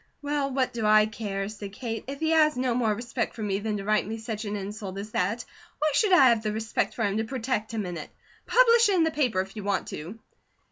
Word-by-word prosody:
"Well, 285 -1 -1
what 260 -1 0
do 230 -2 -3
I 215 0 +6
care?" 205 -3 -4
said 205 -2 -8
Kate. 225 0 -5
"If 275 +1 -6
he 320 0 +1
has 305 -3 +4
no 250 -1 +1
more 230 -2 +1
respect 235 +1 -3
for 220 - -5
me 200 -1 -1
than 210 0 -2
to 200 - -5
write 215 0 +1
me 225 +1 -4
such 220 -1 -5
an 205 0 -3
insult 200 -1 -6
as 205 +2 -6
that, 210 +6 -1 0.3
why 305 +1 +1
should 390 +8 +3
I 275 -8 +7
have 230 -2 +3
the 215 -1 -2
respect 220 +1 -2
for 230 - -1
him 200 0 0
to 220 - +1
protect 225 -2 -2
him 220 -3 -2
in 175 -1 -5
it? 155 - -7 0.4
Publish 470 -2 +5
it 395 - +3
in 340 - +4
the 320 - +1
paper 255 -11 +1
if 195 +2 -9
you 210 - -6
want 200 -1 -1
to." 165 +9 -7
220 Hz, 260 wpm, -27 LUFS, 205-260 Hz, 0.4 s, I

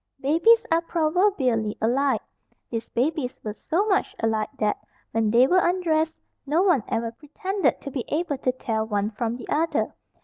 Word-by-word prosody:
Babies 340 - +4
are 330 +1 +4
proverbially 310 - +1
alike. 255 +1 +1 0.5
These 230 -1 -4
babies 260 0 -1
were 215 - -4
so 335 - -1
much 395 -3 +1
alike 220 -1 0
that, 210 -1 0 0.3
when 225 -1 +1
they 235 +4 +6
were 365 +7 +4
undressed, 325 -3 +1 0.3
no 310 +6 +2
one 345 - +3
ever 230 0 -1
pretended 375 - -2
to 280 - -6
be 255 -3 -3
able 300 -3 -1
to 255 - +1
tell 225 -3 -2
one 205 0 -1
from 230 +2 -2
the 245 - -10
other. 325 +3 0
275 Hz, 165 wpm, -25 LUFS, 225-335 Hz, 0.5 s, they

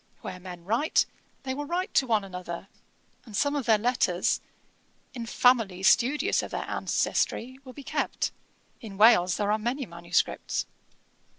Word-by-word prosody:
Where 185 -1 -7
men 180 -2 -10
write, 235 - +2 0.4
they 260 -1 -2
will 290 +2 -5
write 360 +3 -2
to 265 - +3
one 220 -3 +2
another, 180 -1 -7 0.5
and 215 -4 -7
some 285 0 +1
of 275 -4 -2
their 220 -2 +6
letters, 210 -6 +1 0.7
in 235 -3 -6
families 225 -7 +3
studious 275 +5 +2
of - - -6
their - - -4
ancestry, 260 +3 -1
will 255 -1 -11
be 285 - -10
kept. - - -1 0.5
In 210 -5 -9
Wales 185 -5 +6
there 205 0 0
are 215 - +1
many 250 +5 -2
manuscripts. 170 -2 -1
225 Hz, 155 wpm, -27 LUFS, 185-260 Hz, 0.7 s, their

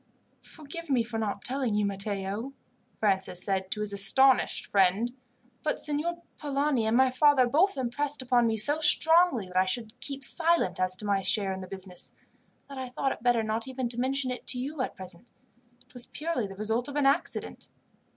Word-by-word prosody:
"Forgive 315 +2 -10
me 255 -4 +2
for 225 -1 -5
not 205 -2 -3
telling 255 -4 +1
you, 210 0 +1
Matteo," 200 +4 -4 0.5
Francis 190 -3 0
said 190 -1 -2
to 210 - -3
his 210 -1 -1
astonished 260 +7 +4
friend; 200 +5 +2 0.5
"but 305 - -1
Signor 330 +4 -2 0.2
Polani, 280 -5 0
and 225 +2 +2
my 260 0 +4
father, 265 0 +4
both 315 +9 +2
impressed 275 +3 -1
upon 245 -2 +3
me 220 -1 0
so 290 +8 +3
strongly 320 - +4
that 180 0 -6
I 185 - +4
should 220 +2 -3
keep 275 0 -5
silent 335 - +3
as 185 0 +1
to 210 - -9
my 200 -1 +1
share 195 0 0
in 190 - -6
the 185 - -8
business, 185 -1 -6 0.5
that 275 -1 -8
I 260 -1 -5
thought 270 +2 -1
it - - -6
better 240 -1 +2
not 220 +3 -3
even 260 -1 -3
to 240 0 -5
mention 260 +1 0
it 250 - -7
to 250 - +2
you 275 +3 -4
at - - -3
present. 185 +4 -2 0.6
It 250 - -26
was 245 -1 -5
purely 305 -8 -3
the 195 - -10
result 220 +4 -2
of 285 - -7
an 290 -2 +1
accident." 275 - -1
245 Hz, 195 wpm, -28 LUFS, 205-275 Hz, 0.6 s, astonished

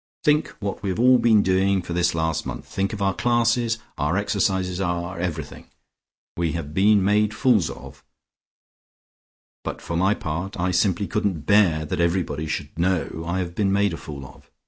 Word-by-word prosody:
Think 150 0 +3
what 100 -3 -4
we 100 - -2
have 95 - -2
all 125 +1 +6
been 110 -3 +4
doing 95 0 +2
for 85 - -5
this 85 -1 +1
last 80 -1 -1
month, - - -6
think 100 +2 -2
of 105 -2 -3
our 95 0 +2
classes, 120 0 +1 0.2
our 75 +6 +1
exercises, 95 -2 0
our 85 0 -2
everything. 80 -4 -5 0.7
We 85 -2 -1
have 75 -3 -5
been 100 +2 +4
made 105 +1 +2
fools 115 - +3
of, - - -11 1.6
but - - -5
for 85 - -5
my 95 +4 +2
part, 85 +5 -5
I 90 +1 +1
simply 95 +2 +1
couldn't 100 -7 -2
bear 90 -7 +3
that 75 - -2
everybody 85 -3 -1
should 75 +1 -5
know 85 -2 0
I 85 +2 -1
had 90 -2 -3
been 100 +1 0
made 100 -1 +2
a - - -4
fool 70 -3 -8
of. - - -16
95 Hz, 180 wpm, -23 LUFS, 85-105 Hz, 1.6 s, all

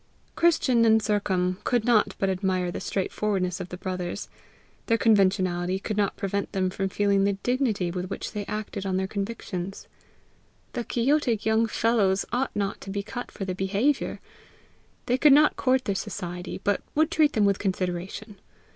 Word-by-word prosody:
Christian 280 -8 +3
and 220 -1 +5
Sercombe 190 -4 0
could 240 -3 +1
not 235 -4 +3
but 195 - 0
admire 185 -1 0
the - - -5
straightforwardness 190 -2 -1
of 185 -1 -6
the 180 - -6
brothers; 185 +1 -4 0.6
their 230 - +3
conventionality 185 -4 +2
could 210 +2 -4
not 200 -1 0
prevent 200 0 -2
them 185 -1 0
from 195 0 -2
feeling 200 0 +2
the 200 0 +2
dignity 240 -8 0
with 180 +1 -4
which 195 - -5
they 210 -1 -4
acted 210 -2 -4
on 190 -1 -1
their 190 - 0
convictions. 195 -2 -5 0.9
The 240 - -2
quixotic 240 -2 +1
young 220 +1 +3
fellows 210 -4 +2
ought 255 +2 -1
not 200 -1 -2
to - - -8
be 200 +1 -3
cut 245 +4 -6
for 195 - -6
their 185 - -2
behaviour! 200 +10 0 0.9
They 250 +1 +1
could 295 0 +7
not 300 +2 +5
court 260 -1 +1
their 200 - 0
society, 180 -2 -5
but 205 0 +1
would 315 +2 +3
treat 305 -2 +3
them 210 -2 +3
with 200 -1 +2
consideration! 190 +2 -3
200 Hz, 170 wpm, -26 LUFS, 185-230 Hz, 0.9 s, could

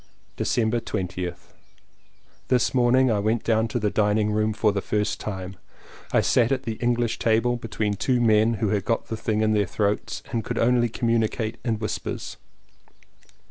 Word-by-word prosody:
December 115 0 0
20th. 90 -5 -5 0.9
This 125 -2 +2
morning 130 0 +4
I 105 - +1
went 110 +3 0
down 110 0 +2
to 115 - -3
the 105 -3 0
dining 105 0 +2
room 110 +1 +1
for 110 0 +2
the 100 -1 -2
first 105 +1 -1
time. 95 -2 -6 0.5
I - - +4
sat 120 0 +2
at 135 -1 0
the 115 -3 -4
English 120 -1 0
table 115 +2 +2
between 110 -3 -2
two 125 +5 0
men 110 0 +3
who 110 -1 -1
had 100 -1 0
got 115 +3 -1
the 115 - -2
thing 110 -1 -1
in 110 0 +2
their 105 -2 +2
throats 105 +2 -2
and 115 -2 -1
could - - -4
only 120 0 +3
communicate 115 -1 -1
in 115 -2 0
whispers. 110 0 -4
110 Hz, 170 wpm, -24 LUFS, 105-120 Hz, 0.9 s, morning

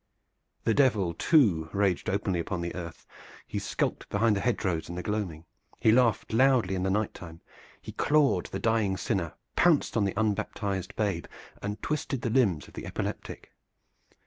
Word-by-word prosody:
The 115 - +2
Devil 110 -11 +3
too 90 - +3
raged 100 -3 +1
openly 95 -2 0
upon 85 +1 -3
the 85 0 -3
earth; 85 -2 -8 0.4
he - - -4
skulked - - -2
behind 105 +1 +2
the - - 0
hedge 120 -2 0
rows 85 -4 -1
in 85 - -5
the 90 - -4
gloaming; 95 -7 -3 0.3
he 110 - +5
laughed 115 -2 +2
loudly 125 -5 +4
in 95 - -1
the 95 - 0
night 105 +2 0
time; 80 -2 -10 0.4
he - - -9
clawed 145 -1 +2
the - - -4
dying 110 -4 +1
sinner, 90 -4 -2 0.2
pounced 170 -5 +3
on 105 -3 +2
the 95 - -2
unbaptized 100 -3 -2
babe, 100 -6 -1 0.3
and 105 +2 -5
twisted 140 -4 -2
the 115 - 0
limbs 100 - +2
of - - -16
the - - -7
epileptic. - - -5
100 Hz, 170 wpm, -28 LUFS, 90-115 Hz, 0.4 s, he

